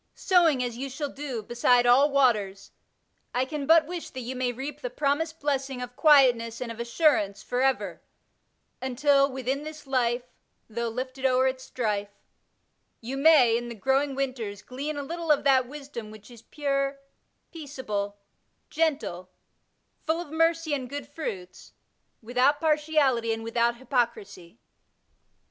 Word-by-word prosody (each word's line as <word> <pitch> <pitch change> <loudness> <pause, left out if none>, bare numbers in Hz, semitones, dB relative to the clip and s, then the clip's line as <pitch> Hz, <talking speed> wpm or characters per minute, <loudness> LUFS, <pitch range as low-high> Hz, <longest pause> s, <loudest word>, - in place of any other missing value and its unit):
Sowing 330 -8 +3
as 240 -2 -4
you 275 +1 -4
shall 285 +2 -4
do 270 -6 -5
beside 240 +2 +3
all 260 +4 +5
waters, 215 -9 +1 0.6
I 255 +1 +2
can 285 0 -5
but 325 -1 +6
wish 345 +1 -6
that 260 - -7
you 250 +2 -5
may 250 -1 0
reap 265 +5 -7
the - - -3
promised 315 - -1
blessing 270 -2 -2
of 250 0 -7
quietness 245 -7 +4
and 245 -2 -4
of 230 - -9
assur 265 +5 +3
ance 200 -1 -4
forever, 260 +2 -1 0.8
until 275 +2 +2
Within 265 +2 -2
this 305 0 -9
life^ 245 -2 0 0.4
Though 235 +1 -3
lifted 255 +3 -6
o'er 260 0 +3
its 260 0 -1
strife; 210 -4 -2 0.9
you 245 +4 -5
may, 275 -5 +6
in 240 0 -3
the 235 - -7
growing 270 +5 +1
winters, 240 -7 -4
glean 285 +4 -5
a 285 - -3
little 335 +3 -5
of 295 - +3
that 265 -3 +4
wisdom 275 -5 -8
which 215 +2 -13
is 235 -2 -13
pure, 275 0 -2 0.5
peaceable, 250 -10 -5 0.5
gentle, 285 - -1 0.8
full 320 +1 +1
of 345 -4 -7
mercy 330 -1 +1
and 260 -3 -3
good 285 -1 -6
fruits, 195 - -7 0.5
without 250 +5 +2
partiality 300 -7 +2
and 225 0 -3
without 235 +1 +1
hypocrisy. 230 -8 -3
260 Hz, 150 wpm, -27 LUFS, 235-290 Hz, 0.9 s, but